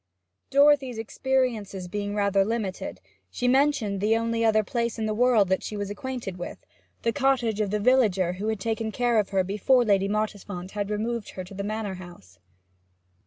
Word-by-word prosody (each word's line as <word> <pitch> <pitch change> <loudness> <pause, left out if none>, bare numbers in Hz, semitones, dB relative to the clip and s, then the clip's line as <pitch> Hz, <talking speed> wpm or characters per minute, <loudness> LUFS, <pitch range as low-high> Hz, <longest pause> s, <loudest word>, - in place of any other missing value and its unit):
Dorothy's 280 -3 +4
experiences 225 -5 -1
being 205 +2 -3
rather 200 -1 +3
limited, 210 -3 -3 0.3
she 245 - -2
mentioned 255 -7 +2
the 220 +2 +3
only 230 0 -1
other 220 -1 +4
place 235 +2 -2
in 220 - -2
the 215 - 0
world 230 -3 +4
that 190 - +1
she 210 - -5
was 205 0 -3
acquainted 230 -4 -5
with, 175 - -6 0.5
the 230 - +1
cottage 250 -6 +1
of 205 - 0
the 210 +1 0
villager 205 -7 +3
who 195 +4 -4
had 220 -2 -1
taken 220 +1 -2
care 240 -1 +2
of 205 - 0
her 195 -2 +2
before 210 +7 +2
Lady 195 -2 +3
Mottisfont 205 -3 -3
had 205 -1 -3
removed 220 +1 -2
her 185 - -4
to 180 - -12
the 200 +1 -4
Manor 210 -1 -3
House. 100 - -14
215 Hz, 180 wpm, -26 LUFS, 200-235 Hz, 0.5 s, Dorothy's